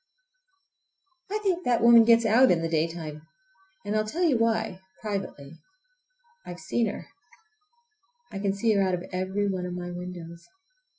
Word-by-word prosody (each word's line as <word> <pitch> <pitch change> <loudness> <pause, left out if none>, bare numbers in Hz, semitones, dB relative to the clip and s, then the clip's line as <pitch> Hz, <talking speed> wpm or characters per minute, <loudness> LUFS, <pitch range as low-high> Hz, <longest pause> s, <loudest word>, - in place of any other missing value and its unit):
I 420 - -1
think 365 -3 0
that 245 -2 +2
woman 235 -1 +8
gets 230 0 +5
out 240 +4 +5
in 165 -2 +2
the - - 0
daytime! 160 -1 -3 0.6
And 205 +1 -2
I'll 215 - +2
tell 320 +12 -3
you 315 -7 +3
why—privately—I've 220 - -6
seen 235 -2 -1
her! 200 - -6 1.3
I 195 - -5
can 200 -1 0
see 220 +2 +1
her 200 - +2
out 185 -1 +1
of 175 - -7
every 190 +2 -1
one 185 -2 -2
of 180 - -5
my 175 0 -6
windows! 175 -1 -8
200 Hz, 145 wpm, -26 LUFS, 180-235 Hz, 1.3 s, woman